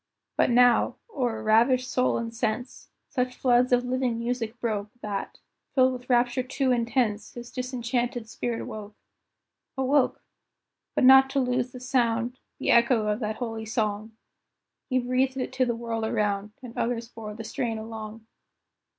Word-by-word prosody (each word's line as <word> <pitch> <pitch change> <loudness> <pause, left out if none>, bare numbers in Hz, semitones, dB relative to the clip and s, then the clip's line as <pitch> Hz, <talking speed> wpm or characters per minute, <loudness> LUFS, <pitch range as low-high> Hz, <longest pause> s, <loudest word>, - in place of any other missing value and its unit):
But - - +3
now, 245 0 +4 0.2
o'er 240 -5 -1
ravished 240 +4 +4
soul 255 0 +1
and 230 0 -4
sense, 235 +2 -3 0.2
Such 250 -2 -2
floods 250 0 +3
of 245 0 +3
living 250 -2 0
music 235 0 -3
broke, 215 -4 -2
That, 205 -2 -4 0.4
filled 260 -1 +5
with 250 0 -9
rapture 245 +1 +3
too 260 +1 0
intense, 235 -3 0
His 240 0 -8
disenchanted 245 -2 -2
spirit 230 +1 -3
woke. 210 -1 -8 0.8
Awoke! 265 +1 +2 0.7
but - - +2
not 265 +1 +8
to 275 +1 0
lose 250 -1 0
the 250 - -9
sound, 245 -1 0 0.2
The - - +1
echo 235 -2 +4
of 210 +1 0
that 215 -2 -2
holy 225 -2 -5
song; 215 0 -2 0.8
He 255 - +2
breathed 255 +1 +1
it 255 - -3
to 255 -1 +1
the 235 - 0
world 230 -1 -3
around, 210 -1 -1
And 235 -2 -9
others 235 -1 -1
bore 220 -2 -8
the 225 - -7
strain 225 +1 -2
along. 220 0 -7
240 Hz, 155 wpm, -27 LUFS, 225-255 Hz, 0.8 s, not